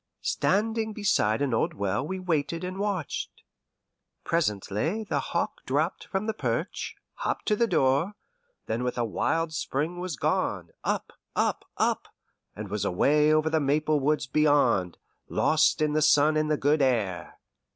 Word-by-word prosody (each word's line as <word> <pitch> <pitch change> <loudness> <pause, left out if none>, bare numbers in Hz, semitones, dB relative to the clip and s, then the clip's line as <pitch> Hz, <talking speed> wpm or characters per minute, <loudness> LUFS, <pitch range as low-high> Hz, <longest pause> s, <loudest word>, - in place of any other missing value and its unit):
Standing 220 +2 0
beside 145 - +1
an 135 -4 0
old 110 - 0
well 100 +4 -1
we 190 +6 -4
waited 165 -1 -1
and 185 +1 -4
watched. 200 -7 -3 0.8
Presently 155 - -1
the 210 - -1
hawk - - -3
dropped - - 0
from 195 +1 -2
the 220 - -1
perch, - - -3 0.2
hopped - - -2
to 210 - +2
the 235 +2 +2
door, 145 +1 +2 0.5
then 115 +2 -2
with 125 0 -2
a 120 - +1
wild 160 +8 -1
spring 160 +2 -2
was 180 -3 -3
gone, - - -1
up, - - -2 0.2
up, - - 0
up, - - 0 0.5
and 105 0 -6
was 105 0 -2
away 150 +11 +3
over 155 0 +3
the 160 - +3
maple 150 +1 +1
woods 150 +2 +1
beyond, 135 - +2 0.3
lost - - +3
in 150 -1 +1
the 155 - +2
sun 150 0 +5
and 155 0 +1
the 150 - +2
good 145 +2 +2
air. 100 - 0
150 Hz, 155 wpm, -27 LUFS, 125-175 Hz, 0.8 s, sun